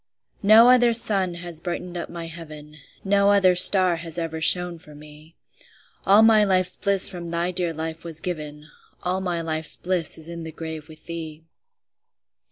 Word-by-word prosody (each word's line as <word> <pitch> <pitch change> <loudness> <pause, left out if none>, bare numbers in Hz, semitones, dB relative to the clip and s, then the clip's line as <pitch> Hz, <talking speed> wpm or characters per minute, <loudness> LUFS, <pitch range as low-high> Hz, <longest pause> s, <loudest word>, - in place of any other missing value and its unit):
No 220 +3 +6
other 245 -2 +3
sun 195 -6 +2
has 170 -2 -8
brightened 175 0 -6
up 175 - -6
my 170 -1 -8
heaven, 155 -2 -12 0.3
No 200 0 +1
other 195 -3 +3
star 180 -1 +7
has 165 0 -9
ever 160 -1 -5
shone 180 +1 +1
for 150 -2 -17
me; 150 +2 -17 0.7
All 205 +3 +5
my 220 -1 +4
life's 185 -2 +1
bliss 200 -1 +1
from 175 -3 -9
thy 170 +1 -3
dear 175 -2 -2
life 160 0 -7
was 165 -2 -2
given, 150 -3 -7 0.4
All 185 +1 -3
my 175 -3 -4
life's 160 -1 -1
bliss 175 -3 -3
is 160 0 -6
in 170 0 -8
the 160 - -8
grave 160 -1 -9
with 155 0 -17
thee. 160 -2 -9
170 Hz, 175 wpm, -22 LUFS, 160-185 Hz, 0.7 s, star